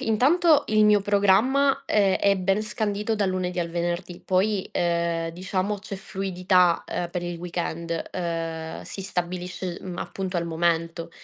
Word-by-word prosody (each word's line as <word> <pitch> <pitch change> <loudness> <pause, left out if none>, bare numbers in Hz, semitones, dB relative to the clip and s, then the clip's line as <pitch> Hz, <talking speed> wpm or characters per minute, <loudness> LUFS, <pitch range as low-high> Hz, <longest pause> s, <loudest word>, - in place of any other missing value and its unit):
intanto 295 +8 +4
il 215 0 +4
mio 210 -1 +5
programma, 205 +8 +3
ehm, 200 -3 +3
è 200 -1 +3
ben 195 +3 +1
scandito 210 0 -1
dal 205 -3 +1
lunedì 180 -1 -1
al 170 - -2
venerdì 175 +1 -3
poi, 190 +1 +1
ehm, 170 -1 0
diciamo 190 +3 -2
c'è 200 0 -7
fluidità, 185 -2 +1
ehm, 175 - -3
per 180 -1 -3
il 175 -1 -4
weekend, 170 -1 -3
ehm, 165 -2 -4
si 195 - -7
stabilisce, 180 -1 -4
mhmm, 180 -2 -7
appunto 190 -2 -4
al 170 - -1
momento. 165 0 -1
185 Hz, 150 wpm, -25 LUFS, 170-205 Hz, -, mio